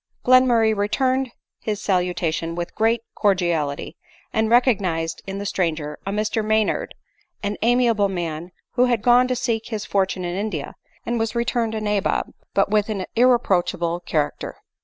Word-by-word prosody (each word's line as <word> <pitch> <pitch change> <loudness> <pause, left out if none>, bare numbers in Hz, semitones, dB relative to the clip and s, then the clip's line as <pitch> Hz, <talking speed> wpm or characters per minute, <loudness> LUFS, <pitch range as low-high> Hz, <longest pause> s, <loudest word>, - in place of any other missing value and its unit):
Glenmurray 245 -3 +5
returned 255 +6 +1 0.3
his 210 -2 -3
salutation 175 -4 -1
with 175 0 -4
great 225 +1 +2
cordiality, 175 -8 0 0.4
and 220 0 +1
recognised 195 -10 +2
in 195 0 -4
the 200 - -4
stranger 160 -6 -2
a - - 0
Mr 215 +1 -1
Maynard, 220 0 0 0.5
an 205 0 -1
amiable 230 -3 +3
man, 170 -2 -4 0.2
who 250 0 +3
had 240 -4 0
gone 245 +1 +5
to 255 - 0
seek 230 -2 -1
his 215 -2 -4
fortune 190 -2 0
in 175 0 -3
India, 210 +3 -3 0.3
and 235 - -1
yvas 225 +1 -2
returned 235 -1 0
a 215 - -2
nabob, 210 -2 0 0.2
but 200 0 +2
with 215 0 +2
an 195 -4 -2
irreproachable 185 -8 +2
character. 155 -4 -2
210 Hz, 150 wpm, -22 LUFS, 180-230 Hz, 0.5 s, Glenmurray